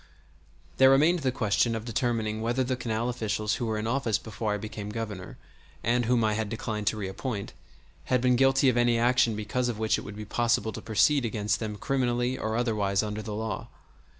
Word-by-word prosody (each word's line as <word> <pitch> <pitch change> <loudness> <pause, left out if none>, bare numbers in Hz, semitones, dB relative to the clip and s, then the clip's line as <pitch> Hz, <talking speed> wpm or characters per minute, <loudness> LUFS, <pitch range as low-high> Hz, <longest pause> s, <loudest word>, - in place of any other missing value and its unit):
There 130 0 +7
remained 155 +6 +4
the 135 -4 0
question 115 -1 +1
of 110 0 -5
determining 115 -3 -1
whether 120 +3 0
the 130 0 -1
canal 115 -1 -2
officials 110 -3 -1
who 120 - -2
were 110 -1 -1
in 105 - -3
office 115 -2 +1
before 110 -1 -4
I 105 - 0
became 105 0 -6
Governor, 105 -4 -6 0.5
and 120 +1 +2
whom 120 0 +2
I 110 -1 +2
had 110 0 -2
declined 110 -2 -4
to 110 - +2
reappoint, 100 +2 -4 0.5
had 125 - +2
been 125 +1 +3
guilty 135 +1 +4
of 125 -2 +3
any 120 -1 +3
action 120 -1 +3
because 115 +4 -1
of 115 - -3
which 110 0 +1
it - - -6
would 105 - -8
be 105 - -6
possible 115 0 +1
to - - -6
proceed 115 +6 +3
against 105 -2 -1
them 110 -2 -4
criminally 125 +1 0
or 110 -3 -2
otherwise 105 -4 +1
under 105 0 -4
the 105 -1 -5
law. 110 -2 -4
115 Hz, 205 wpm, -28 LUFS, 105-125 Hz, 0.5 s, There